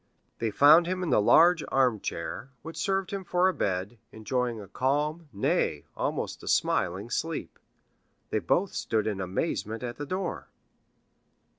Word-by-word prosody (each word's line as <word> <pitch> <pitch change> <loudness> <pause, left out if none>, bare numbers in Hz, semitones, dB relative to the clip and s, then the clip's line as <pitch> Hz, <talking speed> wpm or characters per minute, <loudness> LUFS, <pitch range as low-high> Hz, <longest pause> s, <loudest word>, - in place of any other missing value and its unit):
They 115 - 0
found 150 +9 +6
him 185 0 -2
in 165 - -1
the 110 - +4
large 165 +9 +5
armchair, 125 -1 -1
which 165 +1 -8
served 190 +3 -1
him 195 -1 -4
for 180 +1 +2
a 190 - +2
bed, 95 - -2
enjoying 120 +1 -2
a 100 - -9
calm, 150 - -1
nay, 100 - 0
almost - - -3
a - - -11
smiling - - 0
sleep. - - -3 0.7
They 110 - +1
both 175 - 0
stood 110 -2 -1
in 100 -3 -2
amazement 110 - -2
at 120 -1 -5
the 145 - -5
door. 185 +4 -3
135 Hz, 150 wpm, -28 LUFS, 110-170 Hz, 0.7 s, found